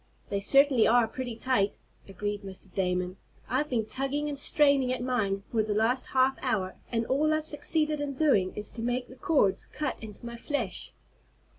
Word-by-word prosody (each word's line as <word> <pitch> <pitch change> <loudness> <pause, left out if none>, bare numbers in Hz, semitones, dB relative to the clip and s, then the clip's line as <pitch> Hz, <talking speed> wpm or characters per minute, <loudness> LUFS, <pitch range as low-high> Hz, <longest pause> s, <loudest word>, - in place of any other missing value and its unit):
"They 200 - 0
certainly 275 +3 +5
are 240 0 +5
pretty 245 0 -5
tight," 230 -4 +1 0.3
agreed 205 +1 -4
Mr. 190 -1 -9
Damon. 180 -1 -1 0.3
"I've 290 +5 0
been 230 -4 0
tugging 275 +5 -1
and 285 -1 -2
straining 280 -3 +4
at 255 -1 -2
mine 205 -6 0
for 225 - +2
the 210 -1 -1
last 235 +4 +1
half 260 0 +2
hour, 210 -8 -1 0.2
and 230 -1 0
all 295 +5 +2
I've 310 0 0
succeeded 305 0 -1
in 280 -1 -3
doing 255 -11 +3
is 210 - -5
to 230 - -7
make 245 +1 -1
the 255 - -11
cords 250 - +1
cut 295 -3 -4
into 220 +1 -9
my 235 0 -6
flesh." 235 -6 -3
245 Hz, 180 wpm, -29 LUFS, 205-275 Hz, 0.3 s, certainly